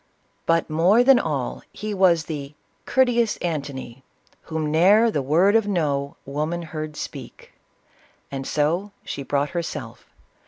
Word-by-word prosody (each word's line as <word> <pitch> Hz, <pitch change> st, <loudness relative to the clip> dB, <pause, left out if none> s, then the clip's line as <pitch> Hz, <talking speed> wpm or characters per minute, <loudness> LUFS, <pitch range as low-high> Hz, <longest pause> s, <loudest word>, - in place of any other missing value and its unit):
But, 165 Hz, 0 st, +2 dB
more 175 Hz, +9 st, +4 dB
than 265 Hz, -1 st, +6 dB
all, 135 Hz, -, -3 dB
he 215 Hz, 0 st, -5 dB
was 180 Hz, -4 st, +4 dB
the 145 Hz, -3 st, -6 dB
" -, -, -42 dB
courteous 240 Hz, -3 st, +2 dB
Antony, 140 Hz, -6 st, -5 dB, 0.4 s
Whom 160 Hz, -2 st, -3 dB
ne'er 205 Hz, +8 st, +5 dB
the 145 Hz, -, 0 dB
word 170 Hz, +10 st, +3 dB
of 225 Hz, -2 st, +3 dB
No 145 Hz, -7 st, -1 dB
woman 155 Hz, +4 st, -3 dB
beard 155 Hz, -1 st, -5 dB
speak, -, -, -8 dB, 0.4 s
— -, -, -34 dB
and 135 Hz, -1 st, -5 dB
so 170 Hz, +7 st, 0 dB
she -, -, -5 dB
brought 140 Hz, +1 st, -1 dB
herself. 170 Hz, -2 st, -5 dB
160 Hz, 145 wpm, -23 LUFS, 145-200 Hz, 0.4 s, than